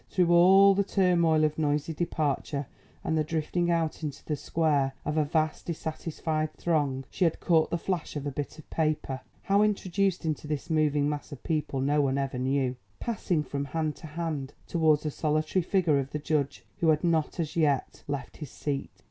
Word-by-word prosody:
Through 175 -2 +3
all 190 +3 +7
the 200 +1 +2
turmoil 175 -5 +3
of 155 0 +1
noisy 150 +1 0
departure 150 -3 -1 0.4
and 160 - 0
the 155 - +2
drifting 165 +3 -1
out 165 -2 0
into 150 -3 -5
the 150 - -1
square 145 -3 +1
of 150 - -1
a 155 - +3
vast, 155 +1 -1
dissatisfied 155 -1 -3
throng, 145 -5 0
she - - -1
had 165 -2 +2
caught 165 -3 +3
the 170 - 0
flash 175 -2 -3
of 145 -1 -4
a 145 - -2
bit 145 +2 -5
of 155 - -13
paper 155 -4 -1 0.2
(how 200 +1 +3
introduced 195 -3 +1
into 155 -1 -2
this 150 +2 -3
moving 150 -2 +2
mass 150 -1 -4
of 145 - -9
people 150 -4 -1
no 145 +2 +2
one 135 -1 +1
ever 135 -2 -2
knew) 130 -1 0 0.2
passing 190 -9 -1
from 140 -1 -3
hand 155 +1 -2
to 160 - -9
hand, 150 -4 -4
towards 160 -3 +2
the 155 - -2
solitary 155 +4 0
figure 170 -5 +2
of 135 0 -3
the - - 0
judge 150 -2 -1
who 165 - +2
had 155 +1 +3
not 165 0 +1
as 160 -3 -2
yet 145 -5 +1
left 140 -3 -4
his 150 -4 -7
seat. 140 +1 -3
155 Hz, 190 wpm, -28 LUFS, 145-170 Hz, 0.4 s, all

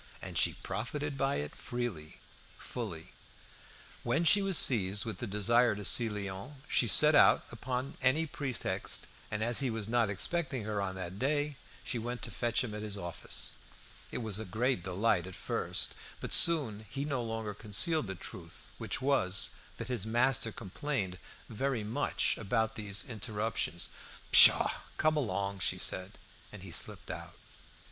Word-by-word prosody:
And - - -8
she - - +3
profited 145 -1 -4
by 135 +1 0
it 75 0 -4
freely, 120 -11 -5 0.4
fully. 95 -10 -7 0.9
When 165 - 0
she 200 +5 +5
was 195 -3 +3
seized 100 -5 +2
with 110 -5 -5
the 120 - -4
desire 110 +3 +3
to 105 -1 -5
see 115 +2 +5
Léon, 100 +5 -6
she 120 - +3
set 150 +8 +6
out 145 - +6
upon 125 +3 -4
any 135 +5 +3
pretext; 140 -5 -1 0.2
and 105 0 -2
as 120 +1 +1
he 135 -2 0
was 110 -3 -3
not 115 -2 +2
expecting 135 - 0
her 105 -1 -2
on 95 -1 -3
that 95 +1 -6
day, 145 +2 0 0.3
she 120 - -2
went 120 +2 -5
to - - -4
fetch 120 +1 0
him 115 -4 -5
at 105 - -5
his 105 -1 -2
office. 85 -3 -5 0.5
It 125 - -4
was 110 -2 -1
a - - -4
great 110 +2 -1
delight 95 0 0
at 95 - -9
first, - - -1 0.3
but - - -2
soon 115 -11 +6
he 140 +2 -4
no 140 -4 -1
longer 110 -2 -4
concealed 110 - +1
the 95 - -5
truth, 85 -1 -11
which - - -3
was, 100 -9 +3 0.3
that 115 - -5
his 120 -6 -1
master 120 0 +2
complained 100 -3 -4 0.3
very 125 0 -2
much 115 +8 0
about 110 +1 0
these 105 -2 -4
interruptions. 110 -6 -2 0.4
"Pshaw! - - +8 0.3
come 155 0 +2
along," 100 -7 -2
she 85 - 0
said. 95 +2 -1 0.4
And - - -10
he - - -9
slipped - - 0
out. - - -8
115 Hz, 165 wpm, -32 LUFS, 100-130 Hz, 0.9 s, Pshaw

